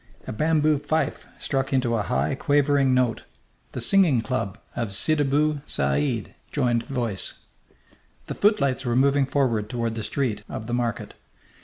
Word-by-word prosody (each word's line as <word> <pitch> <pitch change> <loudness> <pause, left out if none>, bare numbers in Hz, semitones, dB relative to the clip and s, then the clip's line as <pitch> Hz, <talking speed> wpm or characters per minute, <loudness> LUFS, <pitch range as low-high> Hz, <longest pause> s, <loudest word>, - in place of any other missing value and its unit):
A - - -5
bamboo 155 +3 +2
fife 155 0 -2
struck 135 -1 -2
into 125 -3 +1
a 110 - +1
high, 70 -6 0
quavering 145 -2 +2
note. 125 -3 +1 0.5
The 125 - -4
singing 155 -3 +4
club 115 -5 -3 0.2
of 110 -5 -3
Sidibou 150 +1 +1
Sa 70 0 0
d 75 - -2 0.2
joined 120 -2 +1
voice. 120 -8 -3 0.8
The - - -5
footlights 140 - +2
were 120 -2 -1
moving 140 +1 +3
forward 120 -6 0
toward 115 -2 -2
the 115 - -4
street 125 -1 -2
of 110 - -6
the 120 - -4
market. 120 -2 -2
130 Hz, 150 wpm, -24 LUFS, 115-145 Hz, 0.8 s, singing